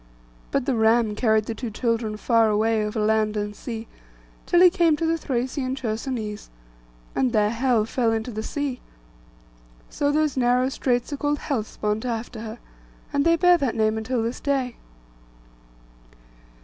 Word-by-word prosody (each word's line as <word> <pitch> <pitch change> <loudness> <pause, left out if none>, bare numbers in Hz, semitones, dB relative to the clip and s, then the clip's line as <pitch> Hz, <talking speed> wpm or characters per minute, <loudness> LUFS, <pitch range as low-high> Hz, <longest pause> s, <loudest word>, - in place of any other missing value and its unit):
But 275 -3 0
the 270 - +1
ram 225 -1 +3
carried 220 -1 +2
the 230 - -3
two 240 +1 -5
children 225 -1 -1
far 225 0 +3
away 215 +1 +2
over 210 +1 -3
land 215 0 +1
and 205 0 -3
sea, 225 +1 -6 0.6
till 350 - +4
he 360 -1 +8
came 340 -4 +3
to 330 - -2
the 325 0 +2
Thracian 260 -2 -2
Chersonese, 220 -3 -4 0.7
and 255 -2 +1
there 210 -1 +3
Helle 235 -2 +2
fell 230 0 0
into 225 +2 -2
the 215 -1 -4
sea. 280 +1 -3 1.1
So 285 0 0
those 305 -1 +1
narrow 250 0 +2
straits 250 +1 -1
are - - -3
called 290 +1 0
'Hellespont,' 215 -6 -2
after 235 -1 -4
her; 220 +1 -7 0.6
and 285 0 +2
they 335 0 +5
bear 355 0 +5
that 270 -5 -1
name 215 -1 +2
until 225 +2 -1
this 230 +2 -3
day. 270 -4 -1
235 Hz, 160 wpm, -24 LUFS, 220-270 Hz, 1.1 s, he